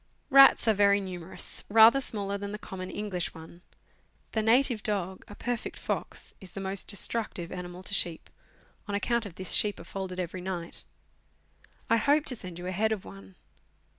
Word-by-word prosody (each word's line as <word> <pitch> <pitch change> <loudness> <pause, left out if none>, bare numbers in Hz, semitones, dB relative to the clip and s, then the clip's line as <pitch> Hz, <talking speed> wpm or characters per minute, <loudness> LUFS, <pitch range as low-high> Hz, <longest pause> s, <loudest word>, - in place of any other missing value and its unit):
Rats 275 -3 +8
are 220 - +6
very 200 0 +4
numerous, 185 -2 -5
rather 225 +5 +7
smaller 200 -5 -2
than 200 0 -5
the 210 - -4
common 185 -3 -7
English 190 -4 -4
one. 165 +2 -12 0.7
The 220 - 0
native 235 +1 +3
dog, 190 -3 -2
a 205 - -10
perfect 240 0 -4
fox, - - -3
is 185 -2 -9
the - - -6
most 195 0 -1
destructive 200 -4 -1
animal 180 0 -7
to 200 - -3
sheep 170 -4 -1 0.6
on 205 - -2
account 235 +2 0
of 175 - -12
this, 185 0 0
sheep 210 -1 +3
are - - -9
folded 185 0 -5
every 180 +1 -4
night. 180 -2 -5 1.0
I 230 - +4
hope 290 +6 +3
to 250 - -1
send 185 -6 -8
you 175 - -7
a 185 - -2
head 215 +4 +1
of 215 -4 -3
one. 95 -1 -12
195 Hz, 180 wpm, -29 LUFS, 180-220 Hz, 1.0 s, Rats